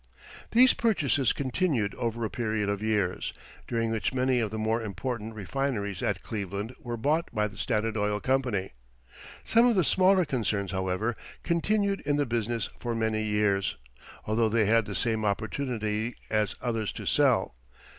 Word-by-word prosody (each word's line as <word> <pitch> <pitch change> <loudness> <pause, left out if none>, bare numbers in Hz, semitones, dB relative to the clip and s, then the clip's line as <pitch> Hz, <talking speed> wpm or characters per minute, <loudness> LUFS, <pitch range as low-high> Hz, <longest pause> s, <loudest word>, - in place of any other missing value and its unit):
These 255 +3 +6
purchases 145 - +2
continued 130 - 0
over 115 -1 -2
a - - -2
period 110 -4 -1
of 100 0 -1
years, 105 -4 0 0.3
during 115 -1 0
which 115 +3 -1
many 130 -1 +2
of 110 -3 0
the 110 - -5
more 110 +2 0
important 110 +2 -4
refineries 105 -2 -2
at - - -1
Cleveland 100 +2 -4
were 120 -1 -5
bought 150 +8 +1
by 105 -2 +1
the 100 - -12
Standard 110 +1 -1
Oil 105 -1 0
Company. 125 -7 0 0.7
Some 230 +2 +4
of 240 - +3
the 185 - +4
smaller 185 +2 +4
concerns, 105 -8 -1
however, 95 +4 -1 0.3
continued 200 +4 +1
in 145 0 0
the 145 0 +1
business 115 -1 -1
for 120 -1 -2
many 110 -1 0
years, 105 -2 +1 0.5
although 110 +1 +2
they 110 0 +3
had 115 +1 +3
the 100 - -5
same 110 +1 +1
opportunity 110 +1 -1 0.2
as 110 -1 +1
others 115 -4 -1
to - - -7
sell. - - +3
115 Hz, 160 wpm, -28 LUFS, 105-130 Hz, 0.7 s, These